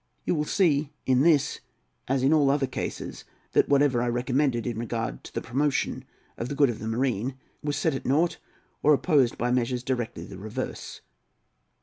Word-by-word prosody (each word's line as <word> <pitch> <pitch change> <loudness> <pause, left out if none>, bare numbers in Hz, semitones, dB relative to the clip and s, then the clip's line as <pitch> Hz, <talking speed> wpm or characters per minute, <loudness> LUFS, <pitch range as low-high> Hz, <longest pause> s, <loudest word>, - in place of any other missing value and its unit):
You - - +1
will 150 -2 0
see 150 -6 +2
in 130 -1 +3
this, 150 -2 +3 0.5
as 135 0 +1
in 140 +4 +4
all 145 -3 +4
other 140 0 +2
cases, 130 - -5 0.3
that - - +3
whatever 140 -3 +3
I 120 - 0
recommended, 125 0 0
in 120 -2 -3
regard 115 -1 -3
to - - -9
the - - -4
promotion 135 +3 -1 0.3
of 120 - -3
the 145 - -3
good 140 -3 +4
of 110 - -8
the 110 - -5
marine, 120 +1 -1 0.3
was 145 -1 -2
set 160 - +1
at 135 - -4
nought, 155 +6 +1 0.4
or 150 0 +6
opposed 140 -6 +2
by 120 +1 0
measures 125 0 0
directly 125 -3 -3
the 95 - -10
reverse. 110 +6 -6
130 Hz, 185 wpm, -27 LUFS, 120-145 Hz, 0.5 s, or